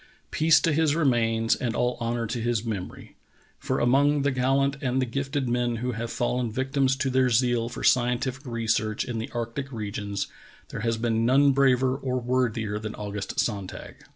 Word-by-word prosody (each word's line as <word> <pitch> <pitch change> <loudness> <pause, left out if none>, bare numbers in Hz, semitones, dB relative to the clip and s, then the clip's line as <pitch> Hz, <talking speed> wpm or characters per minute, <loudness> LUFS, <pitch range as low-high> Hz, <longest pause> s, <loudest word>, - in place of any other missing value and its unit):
Peace 160 0 +4
to 165 - +2
his 155 -1 +2
remains 115 -7 +2
and 120 -4 -3
all 125 0 +1
honor 115 0 -1
to 115 +2 -3
his 120 -1 -1
memory. 100 -5 -6 0.4
For - - -1
among 140 +3 +3
the 140 - +2
gallant 135 +2 +1
and 130 -1 0
the 130 - +1
gifted 135 +2 -2
men 120 0 0
who 125 +2 -2
have 115 0 -4
fallen 120 -1 -1
victims 135 +2 +1
to 135 -1 -1
their 130 0 +3
zeal 120 -1 +2
for 125 - -7
scientific 125 +2 +1
research 110 -2 -1
in 120 -3 -4
the 110 - -4
arctic 120 +3 -4
regions, 105 -3 -4 0.4
there - - -6
has 115 0 0
been 115 0 0
none 135 +4 +5
braver 130 -1 +3
or 130 -2 -2
worthier 120 -4 -1
than 110 0 -6
August 105 -1 -5
Sonn 100 -5 -1
tag. - - -10
120 Hz, 180 wpm, -26 LUFS, 115-130 Hz, 0.4 s, none